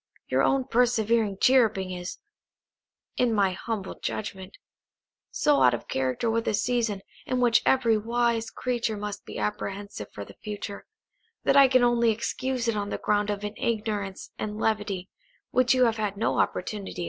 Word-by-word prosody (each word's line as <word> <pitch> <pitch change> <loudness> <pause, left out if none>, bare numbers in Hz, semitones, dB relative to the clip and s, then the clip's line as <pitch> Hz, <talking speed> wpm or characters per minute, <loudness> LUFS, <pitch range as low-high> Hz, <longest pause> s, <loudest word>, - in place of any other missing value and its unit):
Your - - +2
own 270 -1 +2
persevering 230 -4 +2
chirruping 220 -8 +3
is 180 0 -5 1.0
(in 245 -2 +2
my 200 -2 +3
humble 200 +1 -5
judgment) 195 -3 -5 0.7
so 295 -1 +2
out 125 - +5
of - - -9
character 130 - -1
with 230 0 0
a 215 - +2
season, 225 -3 0 0.2
in 255 - 0
which 240 -2 +4
every 235 -5 +4
wise 235 0 0
creature 235 -3 -2
must 205 0 -5
be - - -8
apprehensive 200 - -4
for 100 - -7
the - - -15
future, 205 -1 -6 0.6
that - - +3
I 275 -1 +8
can 255 -1 +4
only 240 -1 +3
excuse 245 +2 -1
it 230 - +1
on 205 -1 -2
the - - -2
ground 210 0 +1
of 205 0 -2
an 210 0 -3
ignorance 210 -4 -2
and 210 0 -3
levity, 205 -4 -1 0.4
which 255 0 +4
you 255 -1 +5
have 225 -1 +1
had 205 -2 -2
no 220 - 0
opportunity 210 +3 -1
of - - -9
correcting." - - -8
220 Hz, 170 wpm, -27 LUFS, 200-240 Hz, 1.0 s, I